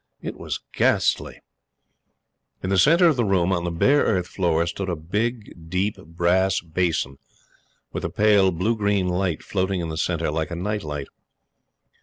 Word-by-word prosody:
It - - -6
was - - -5
ghastly. - - +1 1.2
In 95 - -2
the 95 - +3
centre 170 - +5
of 155 -5 +2
the 120 - +2
room, 95 -3 +2
on 85 -1 -1
the - - 0
bare 135 - +3
earth 95 -9 +1
floor, 85 -3 0
stood 95 +2 -4
a 90 - -1
big, 100 0 -4
deep, 95 +4 0
brass 90 +4 +1
basin, 80 -5 -2 0.7
with - - -4
a - - -1
pale 105 -2 +4
blue 95 +7 0
green 100 -3 +1
light 90 -2 -1
floating 95 -1 -1
in 85 -2 -3
the 80 - -4
centre 85 -2 -1
like 80 0 -2
a 85 - -4
night 105 +4 -2
light. 75 -2 -5
90 Hz, 170 wpm, -23 LUFS, 85-100 Hz, 1.2 s, centre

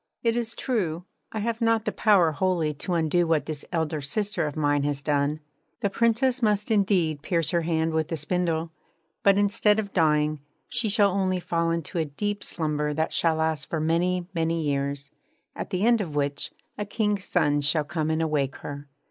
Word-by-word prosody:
It 230 -1 +2
is 230 -1 -2
true, 180 -11 -2 0.3
I 220 - -3
have 230 +2 -2
not 225 -1 +2
the - - 0
power 195 -7 +4
wholly 165 -1 0
to 175 +5 -3
undo 170 +1 +2
what 160 -2 +2
this 155 -2 -4
elder 160 -3 -1
sister 205 +3 -1
of 145 - -5
mine 145 -2 +2
has 140 -1 -2
done. 145 +1 0 0.4
The 200 -3 0
Princess 235 +4 +2
must 210 -1 +1
indeed 185 -8 +2
pierce 165 -1 0
her 170 - +2
hand 160 -1 0
with 160 +1 -1
a 165 - -1
spindle; 165 +1 -1 0.5
but, 200 0 +5
instead 205 +1 +3
of 205 -2 -3
dying, 155 -3 +2 0.3
she 230 -2 -1
shall 205 -1 +4
only 185 -1 0
fall 170 -1 0
into 165 0 -2
a 160 - +1
deep 205 +8 -3
slumber 150 -2 -1
that 160 +1 0
shall 165 -1 +2
last 160 -1 -1
for 160 - -1
many, 175 +3 +1
many 165 -1 0
years, 140 -1 -2 0.4
at - - -5
the 185 +3 0
end 235 -2 +4
of 160 -7 -5
which 145 0 -1 0.3
a 210 - -1
King's 210 -2 -1
son 145 -4 +2
shall 150 +2 +2
come 155 +1 -2
and 160 +1 +1
awake 145 -4 0
her. 145 0 -8
165 Hz, 190 wpm, -26 LUFS, 150-200 Hz, 0.5 s, but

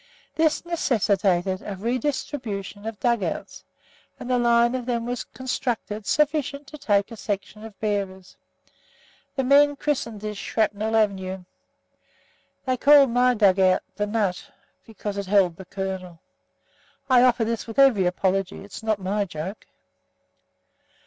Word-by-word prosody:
This 320 +1 +1
necessitated 200 - +1
a 200 - -5
redistribution 225 -3 -3
of 225 -2 -6
dug 235 -3 +1
outs, - - -5 0.6
and 250 - -5
a 250 - +3
line 235 0 +3
of 255 -1 -4
them 235 -2 -1
was 245 0 -3
constructed 235 -5 -4
sufficient 295 -1 0
to 305 - -10
take 205 -7 +1
a - - -7
section 205 0 -5
of 220 -3 -11
bearers. 195 -3 -3 1.0
The 270 - 0
men 285 +2 +5
christened 260 -7 -2
this 210 -1 -5
"Shrapnel 215 0 -1
Avenue." 190 -3 0 1.2
They 255 -1 0
called 280 -1 +6
my 250 +1 +3
dug 200 -3 +4
out 185 -1 +3
"The 205 0 -1
Nut," 205 -4 -1 0.4
because 210 -2 -6
it 200 - -5
held 190 -4 +3
the 190 - -11
"Kernel." 190 -2 -5 0.9
I 255 -2 +5
offer 245 -2 +3
this 230 0 -3
with 225 - -8
every 250 -10 +5
apology. 190 +1 -1
It's 200 - -10
not 220 -1 0
my 200 +2 -1
joke. 175 +3 -7
215 Hz, 140 wpm, -24 LUFS, 195-250 Hz, 1.2 s, called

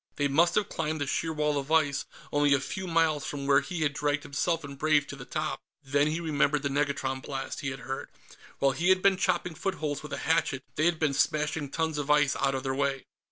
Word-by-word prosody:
They 145 - +1
must 165 +5 +3
have 210 - +2
climbed 155 0 -2
the 145 - -1
sheer 160 +4 -1
wall 150 -2 0
of 140 +2 -6
ice, 145 -3 +2 0.3
only 145 -1 +4
a - - +1
few 190 +7 -5
miles 165 -3 +2
from 140 -1 -4
where 140 0 +5
he 175 -3 -5
had 145 -2 +1
dragged 145 0 0
himself 165 +4 -1
and 140 0 -7
Brave 150 0 +2
to 140 - -8
the 130 -3 -9
top. 155 +2 -3 0.2
Then 145 +2 +2
he 155 +2 -1
remembered 150 -3 +1
the 140 - 0
negatron 140 -2 -1
blasts 135 +2 -5
he 140 - -2
had 135 0 -6
heard. 135 +2 -5 0.5
While 140 0 +3
he 170 +7 0
had 185 0 +4
been 195 -1 +5
chopping 180 -2 0
footholds 160 -5 -3
with 150 -1 -8
a - - -2
hatchet, 155 -4 +1
they 155 - 0
had 170 -1 +3
been 155 -3 +1
smashing 150 +1 0
tons 160 0 -1
of 145 0 -4
ice 150 -1 +4
out 135 0 +1
of 130 - -3
their 135 -1 -1
way. 140 0 -1
145 Hz, 240 wpm, -28 LUFS, 140-160 Hz, 0.5 s, where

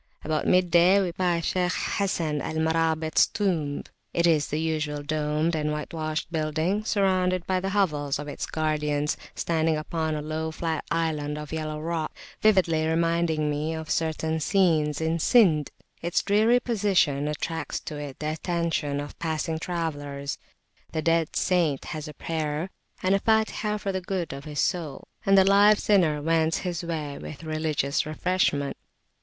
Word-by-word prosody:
About 155 0 0
midday 180 +1 +5
we 185 -3 0
passed 175 -1 0
by 180 -1 +1
Shaykh 180 - -1 0.3
Hasan 165 -7 0
al 160 - -4
Marabit's 160 0 +2
tomb. 175 -10 -1 0.3
It 170 - +2
is 160 -4 +3
the 150 - -2
usual 155 -2 -2
domed 155 +2 0
and 150 -1 -1
whitewashed 155 +1 -3
building, 160 +6 0
surrounded 185 -4 +1
by 185 -1 +1
the 190 +1 -2
hovels 150 -8 +1
of 150 - -6
its 145 - -4
guardians, 150 -1 0 0.2
standing 160 -1 +1
upon 160 0 -2
a 150 - -3
low 155 +1 -3
flat 160 0 -3
island 150 -2 -1
of 150 0 -7
yellow 155 -1 -3
rock, 160 0 -3 0.3
vividly 175 -7 +3
reminding 165 -1 +1
me 150 +2 -1
of 160 0 -5
certain 160 0 0
scenes 160 -4 +2
in 160 +1 0
Sind. 160 - +4 0.3
Its 170 +1 0
dreary 220 +4 +4
position 195 - +1
attracts 155 0 -3
to 150 - -6
it 145 -2 -7
the 155 0 -2
attention 160 -3 -1
of 145 0 -7
passing 160 0 -2
travellers; 145 -5 -4 0.5
the 155 - -1
dead 165 -1 +1
saint 170 -7 +1
has 155 0 -5
a 150 - -9
prayer 160 +3 -3 0.3
and 185 +1 +3
a 195 - +3
Fatihah 220 -1 +1
for 200 - -2
the 190 -1 -2
good 180 -4 -3
of 140 +1 -8
his 150 -2 -5
soul, 165 -6 -1 0.2
and 195 0 +6
the 190 - +7
live 205 +2 +6
sinner 165 -9 +2
wends 160 0 +2
his 175 -3 -2
way 155 -4 -4
with 155 +2 -8
religious 155 -3 0
refreshment. 155 -3 0
160 Hz, 160 wpm, -26 LUFS, 150-180 Hz, 0.5 s, the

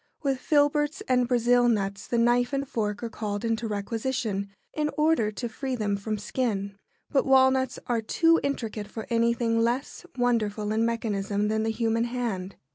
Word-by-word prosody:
With 270 -2 0
filberts 295 +1 +2
and 250 -1 +3
Brazil 245 0 +3
nuts 200 -3 -1
the 240 - 0
knife 240 +3 +3
and 275 0 -1
fork 210 -3 -2
are - - -1
called 210 -2 -3
into 230 0 -1
requisition 215 -1 -2 0.2
in 300 -1 0
order 300 -8 +3
to 240 +3 -4
free 260 +3 -4
them 210 -3 0
from 210 +2 -3
skin, 205 -3 -2 0.4
but 275 - +3
walnuts 265 -1 +4
are 235 -2 0
too 330 +9 +3
intricate 225 -7 -3
for 220 +1 -7
anything 230 0 +2
less 240 +8 -1
wonderful 215 -4 0
in 225 +1 +2
mechanism 210 -3 -1
than 220 0 +1
the 220 - 0
human 225 +1 0
hand. 230 -6 -3
230 Hz, 165 wpm, -27 LUFS, 210-255 Hz, 0.4 s, walnuts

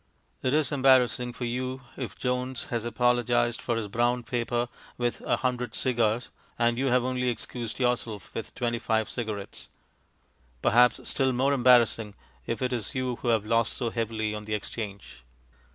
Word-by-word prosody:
It 130 +2 +1
is 155 -4 +2
embarrassing 130 -3 +4
for 125 - -4
you 130 +2 -3
if 130 -4 -6
Jones 125 0 -2
has 115 -1 -1
apologized 120 0 +2
for 120 - -1
his 115 -2 -2
brown 120 +3 +1
paper 120 0 -1 0.3
with 120 -1 -1
a - - +1
hundred 125 -2 -2
cigars, 120 -2 +1 0.3
and 120 0 +2
you 135 - +1
have 125 -1 +3
only 125 0 0
excused 120 0 -4
yourself 120 -5 -1
with - - -6
twenty 120 -1 -1
five 110 -2 0
cigarettes; 110 -4 -5 1.0
perhaps 120 -1 +4
still 130 -1 +1
more 135 +3 +2
embarrassing 120 -5 +4 0.3
if 115 +2 -2
it 125 0 0
is 120 +3 -2
you 130 -2 -1
who - - -6
have 110 -3 +2
lost 115 +1 +2
so 115 -2 -2
heavily 110 -2 -2
on 105 0 -6
the 105 0 -1
exchange. 105 - -6
120 Hz, 165 wpm, -28 LUFS, 115-125 Hz, 1.0 s, embarrassing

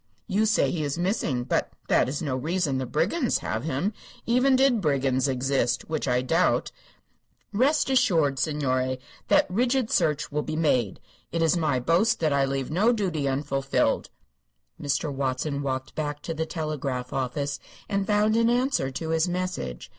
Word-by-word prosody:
You 215 +1 +1
say 215 - +2
he 165 - -2
is 145 +1 -2
missing, 175 - 0
but - - -1
that - - +3
is 145 +4 -3
no 140 -4 -1
reason 150 0 -1
the 130 - -3
brigands 210 - +1
have - - -2
him, 160 +8 -1 0.3
even 255 +3 +3
did 260 -4 +3
brigands 135 -4 +1
exist, 130 -2 0
which 155 -3 -1
I 125 0 +1
doubt. 165 +7 +1 0.8
Rest 275 +8 +2
assured, 165 - +2
signore, 130 -4 0 0.3
that - - +4
rigid 245 +4 0
search 155 -4 +1
will 150 +1 0
be 155 +1 -4
made. 130 - +1 0.3
It 165 0 0
is 165 +2 +3
my 155 -6 +1
boast 170 - +2
that 155 -3 +2
I 140 -1 +3
leave 135 0 -3
no 205 +9 +3
duty 180 - -1
unfulfilled." 135 0 0 0.7
Mr. 145 +1 -1
Watson 135 +2 -2
walked 130 -1 -3
back 150 -1 -4
to 165 - -3
the 160 0 -3
telegraph 140 -6 -3
office 140 +2 -2 0.3
and 200 -1 -1
found 210 +1 +3
an 230 0 +3
answer 245 - +1
to 160 +5 -5
his 160 +2 +1
message. 175 - -4
155 Hz, 165 wpm, -26 LUFS, 135-185 Hz, 0.8 s, that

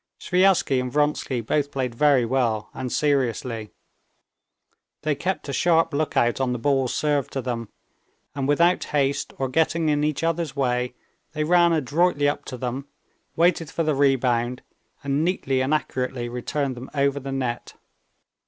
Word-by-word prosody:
Sviazhsky 180 -7 +3
and 125 0 -4
Vronsky 145 -3 0
both 145 +5 0
played 130 -3 -2
very 135 -1 +3
well 115 -4 0
and 130 -1 -5
seriously. 125 -6 0 1.3
They 155 -1 +1
kept 180 +6 -3
a 140 - -4
sharp 165 -1 +2
lookout 140 -4 +1
on 125 -1 +1
the - - -2
balls 135 +1 +1
served 145 -3 0
to 135 - -2
them, 115 -3 -4 0.6
and 135 -1 -2
without 170 +5 +3
haste 140 -1 0
or 135 - -1
getting 160 +4 +1
in 145 0 +1
each 150 0 -1
other's 165 -3 -1
way, 125 -2 0 0.4
they 155 -1 -1
ran 175 +1 +4
adroitly 155 0 +2
up 145 0 -2
to 130 - -6
them, 130 +3 -4 0.5
waited 165 -2 +2
for 165 - -1
the 155 -1 +1
rebound, 125 -3 +1 0.4
and 140 +2 0
neatly 135 -7 0
and 130 +2 -1
accurately 130 -4 -1
returned 130 +3 -2
them 125 +2 -9
over 140 0 +1
the 135 0 -6
net. 125 -3 -3
140 Hz, 155 wpm, -24 LUFS, 125-150 Hz, 1.3 s, ran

